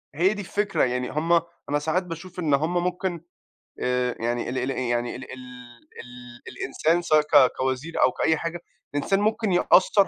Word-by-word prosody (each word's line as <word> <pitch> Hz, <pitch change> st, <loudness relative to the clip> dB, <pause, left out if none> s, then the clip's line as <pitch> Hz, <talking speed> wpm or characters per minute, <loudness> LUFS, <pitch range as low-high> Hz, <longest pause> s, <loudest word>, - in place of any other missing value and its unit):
هي 180 Hz, +6 st, +3 dB
دي 210 Hz, -, -5 dB
الفكرة، 205 Hz, +2 st, 0 dB
يعني 125 Hz, 0 st, -1 dB
هُم 160 Hz, +4 st, 0 dB, 0.4 s
أنا 145 Hz, +1 st, +1 dB
ساعات 160 Hz, +5 st, 0 dB
باشوف 180 Hz, +1 st, -8 dB
إن 155 Hz, -5 st, +1 dB
هُم 155 Hz, +5 st, +1 dB
ممكن 180 Hz, -1 st, -2 dB, 0.6 s
آآ 125 Hz, -1 st, 0 dB
يعني 120 Hz, +1 st, -2 dB
ال 130 Hz, -, -3 dB
ال 125 Hz, +1 st, -1 dB
يعني 120 Hz, -2 st, -1 dB
ال 130 Hz, -, -7 dB
ال 130 Hz, -, -9 dB, 0.6 s
ال 125 Hz, 0 st, -12 dB
الإنسان 165 Hz, +5 st, 0 dB
سواء 155 Hz, -2 st, +4 dB
ك 145 Hz, -4 st, +5 dB
كوزير 130 Hz, +5 st, -2 dB
أو 130 Hz, -, +5 dB
كأي 160 Hz, +4 st, +1 dB
حاجة، 170 Hz, +2 st, -4 dB, 0.4 s
الإنسان 195 Hz, +7 st, +1 dB
ممكن 215 Hz, -1 st, +1 dB
يأثر 190 Hz, +2 st, +4 dB
155 Hz, 175 wpm, -25 LUFS, 125-180 Hz, 0.6 s, ك